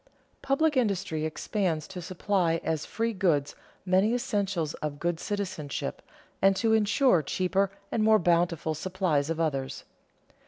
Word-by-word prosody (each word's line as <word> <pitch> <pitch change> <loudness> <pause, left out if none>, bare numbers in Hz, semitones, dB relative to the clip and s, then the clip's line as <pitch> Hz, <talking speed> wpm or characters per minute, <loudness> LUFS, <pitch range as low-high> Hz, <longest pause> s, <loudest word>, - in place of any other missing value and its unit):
_Public 295 +3 +2
industry 195 -10 0
expands 160 -1 -2
to 185 -2 -6
supply 180 -1 0
as 160 -2 -2
free 230 0 -1
goods 160 -8 +1 0.3
many 190 +5 +3
essentials 195 -9 -1
of 150 -1 -3
good 170 -1 -1
citizenship, 185 -9 -4 0.4
and 195 0 +5
to 220 +3 +2
insure 215 - +4
cheaper 190 +5 0 0.2
and 220 - +1
more 220 0 +6
bountiful 170 -3 +1
supplies 165 -3 -1
of 165 0 -2
others. 135 -5 -2
185 Hz, 130 wpm, -28 LUFS, 160-205 Hz, 0.4 s, more